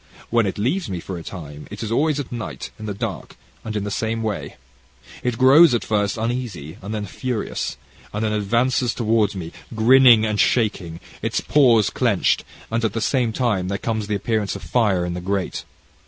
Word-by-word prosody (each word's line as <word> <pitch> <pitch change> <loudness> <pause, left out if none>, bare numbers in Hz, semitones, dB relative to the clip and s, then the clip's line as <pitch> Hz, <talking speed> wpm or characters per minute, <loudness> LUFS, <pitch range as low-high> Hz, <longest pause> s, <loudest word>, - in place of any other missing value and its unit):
"When 115 -3 +3
it 95 - -3
leaves 130 - -1
me 90 -2 -3
for 90 +1 -6
a - - -9
time, 75 -5 -9
it 105 +2 -7
is 110 - -4
always 150 +4 +2
at 140 - -5
night, 120 -3 -6
in 110 - -6
the 105 - -2
dark, - - -5 0.3
and 110 -1 -5
in 105 - -1
the 105 - -4
same 115 +2 -2
way. 110 -2 -3 0.7
It 125 -2 -1
grows 135 +3 +7
at 120 - -1
first 105 -1 0
uneasy, 110 - -4
and 100 +2 -7
then 105 -1 -3
furious, 120 +3 -3 0.3
and 105 +2 -2
then 105 - 0
advances 115 +4 +1
towards 110 -3 +1
me, 85 -3 -6 0.2
grinning 120 0 +6
and 105 -1 -1
shaking, 95 -8 +1 0.2
its - - 0
paws 120 -8 +4
clenched, - - +1 0.3
and, 115 +1 0
at 110 -3 0
the 115 - -1
same 120 0 +1
time, 110 -7 0
there 100 +1 -1
comes 110 -1 -2
the 105 - 0
appearance 105 0 -1
of - - -8
fire 100 -7 +1
in 90 - -3
the 90 - -5
grate. 95 0 -2
110 Hz, 200 wpm, -22 LUFS, 100-120 Hz, 0.7 s, grows